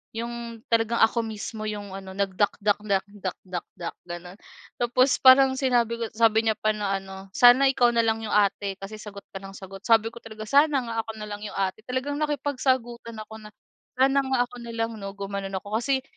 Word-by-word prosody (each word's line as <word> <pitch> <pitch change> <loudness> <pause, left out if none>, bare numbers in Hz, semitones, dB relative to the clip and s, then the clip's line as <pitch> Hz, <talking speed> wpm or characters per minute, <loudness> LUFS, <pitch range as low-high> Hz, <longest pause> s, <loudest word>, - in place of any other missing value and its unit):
yung 235 +1 -3 0.4
talagang 230 0 +2
ako 230 +1 +4
mismo 220 0 -6
yung 205 -2 -5
ano, 190 -1 -8
nagdakdak-dakdak-dakdak, 195 -3 -2
gano'n. 175 +2 -8 0.4
Tapos 250 +2 +3
parang 265 0 +8
sinabi 240 -3 +2
ko - - -2
sabi 225 0 +4
niya 220 - +3
pa 215 - +2
na 195 -2 -1
ano, 190 0 -11
"Sana 250 +3 +7
ikaw 245 -2 +4
na 230 - +4
lang 225 0 +1
'yong 215 - -3
ate, 200 -1 +2
kasi 200 +2 -7
sagot 200 -1 -9
ka 195 - -5
nang 195 0 -10
sagot." 195 0 -9
sabi 225 0 +4
ko 235 - -10
talaga, 220 -1 -9
"Sana 285 -1 +4
nga 230 0 -5
ako 225 - -6
na 210 0 -6
lang 205 - -5
'yong - - -7
ate." 195 +1 -1
Talagang 260 +3 -2
nakipagsagutan 255 -5 -1
ako 220 0 -11
na, 210 - -10 0.5
"Sana 270 +1 +4
nga 265 -1 0
ako 245 - -14
na 235 - -7
lang 225 0 -1
'no," 195 0 -6
gumano'n 200 -1 -4
ako, 205 +3 -2
"kasi 265 +1 0
220 Hz, 190 wpm, -26 LUFS, 200-245 Hz, 0.5 s, parang